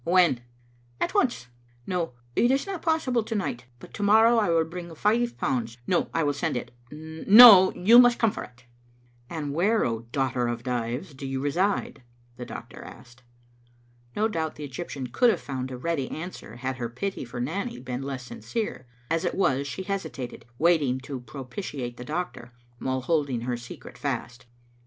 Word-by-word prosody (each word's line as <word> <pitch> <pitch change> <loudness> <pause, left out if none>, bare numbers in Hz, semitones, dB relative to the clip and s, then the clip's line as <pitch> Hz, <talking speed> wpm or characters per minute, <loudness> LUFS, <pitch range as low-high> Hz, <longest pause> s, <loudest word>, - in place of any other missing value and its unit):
"When?" 170 -8 +3 0.6
"At - - -1
once. 240 - +1 0.4
No, 175 -6 -2 0.2
it 240 - +4
is 270 +1 +2
not 390 -4 -5
possible 315 -8 +1
to 220 +1 -5
night, 125 - -3
but - - -14
to - - -6
morrow 220 +3 +5
I 210 - +1
will 165 -1 +3
bring 170 0 -8
five 235 +7 +1
pounds; 115 -3 -2
no, 175 - +1
I 165 - 0
will 145 -1 +1
send 140 -2 -1
it; - - -6 0.2
no, 185 - +8
you 225 +7 +7
must 245 -1 +6
come 225 -2 +3
for - - -6
it. 125 0 -15 0.3
" 120 0 -33
"And 150 -4 -4
where, 205 +8 +2
O 115 -1 -1
daughter 130 -2 0
of 120 0 -3
Dives, 125 +6 -3
do 135 0 -7
you 135 0 -2
reside?" 175 +8 0 0.3
the 125 - -8
doctor - - -9
asked. 120 0 -13 0.9
No 215 +1 +2
doubt 160 -7 -3
the 150 -1 -6
Eg3rptian 135 -2 -6
could 245 - +4
have - - +1
found 130 -2 -5
a 130 - -6
ready 140 -1 -2
an 175 +4 -5
swer - - -11
had 130 +1 -3
her 120 -2 -3
pity 190 +12 -4
for 120 0 -7
Nanny 200 - -3
been 125 0 -5
less 135 -2 -5
sinjcere; 215 - -4 0.3
as 165 0 +1
it - - -1
was, 140 -7 +1
she 190 - -5
hesitated, 135 - -5
wanting 150 -5 +3
to 135 -1 -6
propitiate 130 -1 -6
the - - -7
doctor, 150 -6 -5 0.3
while 130 0 -1
holding 140 -4 0
her 120 +1 -2
secret 120 0 -10
fast. 120 +1 -4
145 Hz, 185 wpm, -26 LUFS, 125-195 Hz, 0.9 s, no